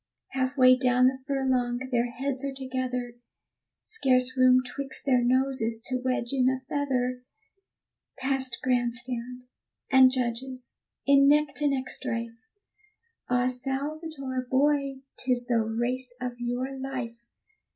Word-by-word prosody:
Half 260 +1 -2
way 255 -1 +7
down 250 0 +3
the 260 +1 +2
furlong, 260 -2 0
their 240 0 +1
heads 265 +2 -3
are 275 - -2
together, 255 -2 -4 0.7
Scarce 255 - +2
room 255 0 +5
'twixt 270 +3 -4
their 255 -3 +3
noses 255 -2 +1
to 255 -1 0
wedge 255 -1 -1
in 260 -1 +3
a 260 0 -1
feather; 255 -2 -2 1.0
Past 265 -2 0
grand 245 -2 +1
stand, 250 0 -5 0.5
and 265 -1 +8
judges, 255 0 -2 0.3
in 275 0 +6
neck 300 +1 +4
to 295 - +2
neck 265 -2 -1
strife, 230 -2 -3 0.8
Ah, 250 0 +2
Salvator, 270 0 -4
boy! 275 0 +1 0.2
'tis 250 -1 +1
the 235 -2 +1
race 245 +3 -2
of 250 -1 -5
your 245 +3 -3
life. 250 -3 -6
255 Hz, 130 wpm, -27 LUFS, 245-270 Hz, 1.0 s, and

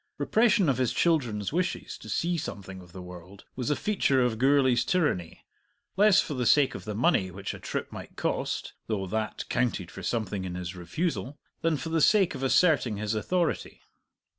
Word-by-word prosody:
Repression 220 -4 +3
of 130 -3 +1
his 125 -2 +1
children's 125 - +1
wishes 180 +2 -2
to - - -11
see 175 +1 0
something 95 - -6
of 90 -1 -15
the 90 +1 -9
world 90 +2 -12
was 125 0 -2
a 150 - +2
feature 185 -10 +1
of 115 -3 0
Gourlay's 130 -2 +4
tyranny, 150 - -1 0.5
less 205 0 +6
for - - -1
the 125 -3 -1
sake 145 +1 +4
of - - -8
the 105 -1 -4
money 110 - +2
which 95 +2 -6
a - - -9
trip - - -4
might - - -9
cost - - -2
(though 105 -4 -1
that 110 +3 -3
counted 115 -7 -1
for 95 - -9
something 105 0 -2
in 90 -1 -5
his 90 0 -5
refusal) 140 - -3 0.2
than 165 -2 +1
for 140 +4 -5
the 160 0 +1
sake 200 +2 +4
of - - -7
asserting 135 - +3
his 105 +1 -2
authority. 170 - -1
125 Hz, 190 wpm, -28 LUFS, 100-160 Hz, 0.5 s, less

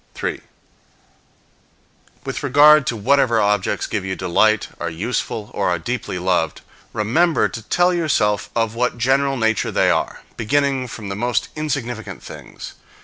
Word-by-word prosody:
3. - - -3 1.8
With - - -4
regard 150 +1 +6
to 120 - 0
whatever 120 +1 +3
objects 105 -2 +1
give 105 -3 -3
you 95 0 -3
delight, 105 +4 +2
are 85 - -2
useful, 105 +4 -3
or 100 - 0
are 90 - +1
deeply 120 +2 -4
loved, 90 -3 0 0.3
remember 155 +11 +2
to 115 - -7
tell 175 +10 +2
yourself 135 - +1
of 115 -2 0
what 125 +1 -1
general 135 +3 +1
nature 110 -3 +1
they - - +3
are, - - -2
beginning 135 +2 0
from 105 -3 -8
the 95 - -3
most 120 +3 -1
insignificant 135 -7 -4
things. - - -10
115 Hz, 145 wpm, -20 LUFS, 105-135 Hz, 1.8 s, regard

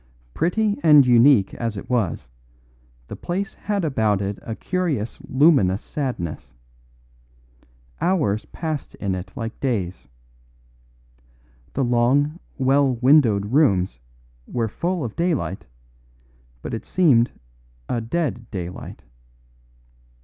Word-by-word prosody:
Pretty 205 +5 0
and 150 -4 +7
unique 120 -3 +5
as 115 -3 -3
it - - -7
was, 110 - -1 0.8
the - - -7
place 195 +3 -3
had 200 -4 -2
about 110 -8 +1
it 100 0 -3
a 115 - -6
curious 160 - -2
luminous 130 - +3
sadness. 105 - -5 1.5
Hours 145 - +1
passed 155 +1 -5
in 100 -2 -2
it 95 0 -6
like 115 -1 -6
days. 100 -9 -2 1.7
The 135 - 0
long, 130 +6 +2 0.2
well 135 0 +3
windowed 120 -5 +3
rooms 95 - +2 0.5
were 115 -2 -1
full 175 - -2
of 115 -3 -5
daylight, 140 - -1 1.0
but - - -5
it 115 - -4
seemed 130 -10 +3 0.6
a 120 - -1
dead 120 -2 -3
daylight. 90 -2 -7
125 Hz, 105 wpm, -22 LUFS, 105-155 Hz, 1.7 s, and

